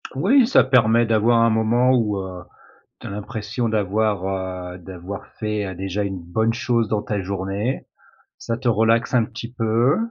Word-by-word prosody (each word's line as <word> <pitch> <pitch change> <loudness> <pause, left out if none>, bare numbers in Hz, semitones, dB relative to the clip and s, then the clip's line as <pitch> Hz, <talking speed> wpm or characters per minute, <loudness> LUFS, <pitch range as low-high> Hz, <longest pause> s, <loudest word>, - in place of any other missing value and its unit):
Oui, 230 - +4
ça 265 - +5
permet 120 -3 +4
d'avoir 115 +1 +3
un 115 - +4
moment 115 +3 +2
où, 110 -5 +1
heu, 95 -2 -6 0.6
tu - - -9
as - - -6
l'impression 105 +3 -4
d'avoir, 105 -2 0 0.5
heu, - - -9
d'avoir 95 +2 -8
fait, 105 -1 -2
heu, 95 -1 -6
déjà 95 +2 -3
une 95 -2 -4
bonne 110 +7 0
chose 120 -2 0
dans 110 -2 0
ta 105 -1 -3
journée. 100 +5 -3 0.5
Ça 115 - -3
te 120 +1 -2
relaxe 115 +2 +2
un 120 -2 +4
petit 115 +2 -8
peu 115 +2 +2
110 Hz, 170 wpm, -22 LUFS, 100-120 Hz, 0.6 s, ça